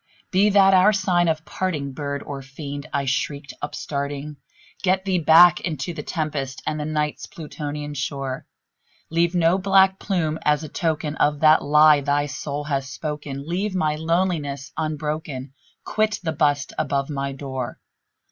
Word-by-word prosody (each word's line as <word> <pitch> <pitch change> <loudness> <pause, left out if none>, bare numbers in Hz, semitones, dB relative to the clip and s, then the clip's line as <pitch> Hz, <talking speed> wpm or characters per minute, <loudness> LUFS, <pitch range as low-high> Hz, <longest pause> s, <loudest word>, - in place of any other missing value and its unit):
"Be 195 +3 +4
that 195 -1 +5
word - - +7
our 205 +4 +5
sign 185 -3 +2
of 160 -1 -1
parting, 155 -7 -2
bird 140 0 -4
or 140 -1 -6
fiend!" 140 +1 -7
I 140 -1 -1
shrieked, 140 +2 -2
upstarting 145 0 -4 0.4
"Get 190 0 +1
thee 185 -2 +1
back 170 +2 +7
into 160 -1 -3
the 155 - -5
tempest 145 -4 -3
and 155 - -2
the 150 - -3
Night's 150 -1 -2
Plutonian 150 -2 -6
shore! 135 -2 -4 0.6
Leave 170 +2 +2
no 175 +2 +3
black 190 0 +4
plume 160 -6 -1
as 150 0 +2
a 155 - -7
token 155 -1 -2
of 145 0 +1
that 155 0 +6
lie 150 0 +6
thy 145 +1 +1
soul 145 0 -4
hath 140 -2 -1
spoken! 145 -1 -5
Leave 190 +4 -2
my 155 -5 +1
loneliness 160 -4 -1
unbroken! 150 -3 -3 0.3
quit 215 0 0
the 160 - -1
bust 145 -2 +1
above 140 +1 -1
my 140 -1 -2
door! 130 -2 -5
150 Hz, 155 wpm, -23 LUFS, 140-170 Hz, 0.6 s, word